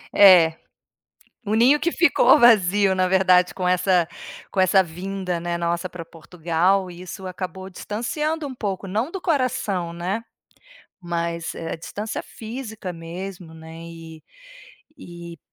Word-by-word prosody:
É, 180 -5 +8 0.9
o 210 - -1
ninho 255 +6 +5
que 340 +3 0
ficou 330 -2 +5
vazio, 205 -5 +5
na 185 0 +2
verdade, 185 -1 +4
com 180 -1 -2
essa 180 -1 +2 0.4
com 195 - -2
essa 190 +1 +5
vinda, 180 +1 -4
né, 170 0 -3
nossa 170 +1 -2
para 170 -2 -8
Portugal, 175 +3 -1
e 175 +1 -11
isso 190 +1 -8
acabou 185 +1 -6
distanciando 300 - -3
um 260 - -8
pouco. 195 -4 -4
Não 220 - -2
do 385 - -6
coração, 250 - -1
né, 180 +6 -3 0.8
mas, 170 -1 -3
eh, 165 - -5
a - - -3
distância 210 +6 -5
física 220 -5 -7
mesmo, 170 0 -8
né, 160 0 -11
e 165 -1 -11 0.8
e 170 -1 -10
185 Hz, 140 wpm, -23 LUFS, 170-205 Hz, 0.9 s, É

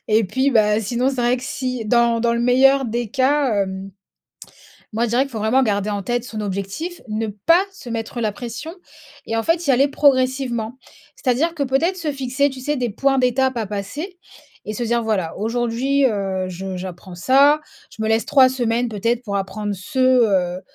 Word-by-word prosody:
et 220 0 +3
puis, 260 +8 0
bah, 215 -3 +3
sinon 240 +5 0
c'est 265 - -5
vrai 240 +1 +2
que 250 - -9
si 255 -3 -3
dans 235 +1 +3
dans 235 0 +2
le 235 - 0
meilleur 265 +2 +4
des 235 0 -2
cas, 270 -2 +2
hem, 190 0 -6 1.0
moi 230 +2 0
je - - -3
dirais 245 +3 +3
qu'il 275 - -10
faut 220 - -5
vraiment 225 +5 +3
garder 205 -3 0
en 205 -2 -3
tête 240 +3 -1
son 220 -3 -5
objectif. 200 - -4
Ne 220 +1 -2
pas 215 - +3
se 265 -10 -11
mettre 230 +1 -4
la 215 -2 0
pression 240 - -7 0.5
et 225 - -3
en 225 - +1
fait 335 +1 +1
y 280 - +4
aller 270 +3 +4
progressivement. 260 -4 +1 0.4
C'est-à-dire 295 +7 0
que 285 - -1
peut-être 300 +8 +1
se 315 -4 -2
fixer 275 +1 0
tu 265 - -9
sais 295 +3 -1
des 245 -4 -1
points 270 +5 +1
d'étapes 255 0 +1
à 225 - -1
passer 215 - -6 0.5
et 215 - -4
se 240 - -3
dire: 235 0 0
«Voilà, 195 -7 -1
aujourd'hui, 240 +5 0
heu, 195 -5 -1
je 185 +1 -5
j'apprends 180 0 -8
ça, 275 - +4 0.3
je - - -9
me 220 - 0
laisse 225 +1 +1
3 265 -3 +6
semaines, 245 -2 0
peut-être, 230 +2 -1
pour 205 -5 -4
apprendre 205 +1 -3
ce, 260 +9 -6
heu, 200 -9 +3
240 Hz, 200 wpm, -21 LUFS, 215-265 Hz, 1.0 s, 3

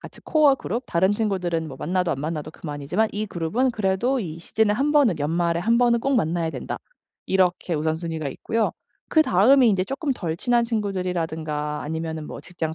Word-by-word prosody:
같이 - - -12
코어 295 -4 +4
그룹 235 0 -3
다른 185 +4 +2
친구들은 180 -7 -1
뭐 135 - -8
만나도 180 +1 0
안 140 - -2
만나도 155 0 -4
그만이지만 155 +8 -2
'이 210 +1 -2
그룹은 200 +9 0
그래도 220 +4 0
이 165 -8 -5
시즌에 210 +4 +1
1 275 +7 +1
번은 265 - +4
연말에 170 +3 0
1 230 +5 +3
번은 240 -1 +3
꼭 275 +2 +1
만나야 165 -4 0
된다.' - - -5 0.5
이렇게 180 -2 +1
우선순위가 160 0 -2
있고요. 225 +9 -1 0.4
그다음이 260 - +5
이제 190 -2 +1
쪼끔 275 - -3
덜 170 -9 -3
친한 240 +5 +2
친구들이라든가 165 -8 -2
아니면은 160 0 -4
뭐 - - -8
직장 160 -3 -4
180 Hz, 400 characters per minute, -24 LUFS, 160-230 Hz, 0.5 s, 그다음이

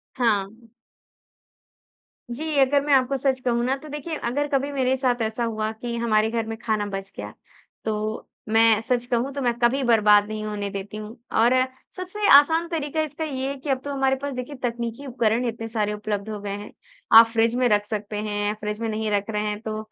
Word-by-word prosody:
हाँ। 225 -1 -1 1.6
जी 260 +6 -4 0.2
अगर 280 +1 +4
मैं 290 - +1
आपको 265 +1 +3
सच 265 0 0
कहूँ 235 -1 +1
ना 265 +2 +1
तो 305 +3 -12
देखिए 300 +2 -5
अगर 285 +5 0
कभी 275 0 0
मेरे 265 -1 +1
साथ 250 -2 0
ऐसा 225 +2 -1
हुआ 220 -1 -2
कि 235 -1 -3
हमारे 220 -1 +2
घर 230 -1 -2
में 225 0 -4
खाना 215 -3 -1
बच 195 -1 -6
गया, 105 +1 -6 0.5
तो 215 0 -3 0.2
मैं 225 0 +5
सच 245 -2 +1
कहूँ 250 +2 -1
तो 280 - -4
मैं 240 -1 +2
कभी 245 +3 +2
बर्बाद 210 -3 +5
नहीं 215 0 -4
होने 205 -1 -3
देती 200 +1 -6
हूँ 215 0 -7 0.3
और 240 +2 +5 0.4
सबसे 370 +3 -3
आसान 320 +4 +4
तरीका 315 -2 -2
इसका 310 +1 -4
ये 270 -3 -3
है 280 - -4
कि 280 +2 -5
अब 265 -1 +1
तो 285 - -4
हमारे 270 -1 +1
पास 285 0 -3
देखिए 250 +3 -6
तकनीकी 235 +2 -3
उपकरण 235 -1 0
इतने 225 0 -5
सारे 210 -2 -1
उपलब्ध 210 0 -4
हो 210 -1 -5
गए 205 - -5
हैं। 205 +1 -9 0.5
आप 230 - +9
फ़्रिज 230 0 +2
में 250 0 +2
रख 205 -1 +2
सकते 210 -1 -4
हैं 205 -1 -2
या 210 - 0
फ़्रिज 210 0 -5
में 230 - -2
नहीं 220 0 -2
रख 205 +1 0
रहे 210 -1 -1
हैं 210 0 -4
तो 220 -1 -4
230 Hz, 210 wpm, -24 LUFS, 215-265 Hz, 1.6 s, आप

